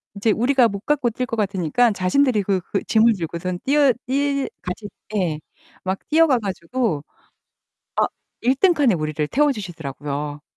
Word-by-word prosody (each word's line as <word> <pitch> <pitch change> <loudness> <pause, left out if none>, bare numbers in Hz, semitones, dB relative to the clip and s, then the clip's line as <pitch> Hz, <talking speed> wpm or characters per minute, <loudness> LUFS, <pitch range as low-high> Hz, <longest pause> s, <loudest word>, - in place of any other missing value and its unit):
인제 210 +2 +1
우리가 245 +2 +3
못 200 -2 -5
갖고 285 -5 +2
뛸 250 +3 -3
것 230 - -4
같으니까 200 +3 +2
자신들이 210 +4 +2
그 190 -1 +1
그 195 - -3
짐을 225 +1 +4
들고선 170 +2 -4
뛰어 280 -2 +4
뛰 280 +1 0
같이 200 +3 -5 0.3
예. 165 -6 0 0.4
막 190 +1 -2
뛰어가 305 -5 +4
가지고 195 - -2 0.9
아 - - +3 0.4
1 255 +3 +3
등 370 +3 +5
칸에 270 - +3
우리를 155 -1 -2
태워 295 +1 +3
주시더라고요. 150 - -5
210 Hz, 300 characters per minute, -22 LUFS, 175-260 Hz, 0.9 s, 등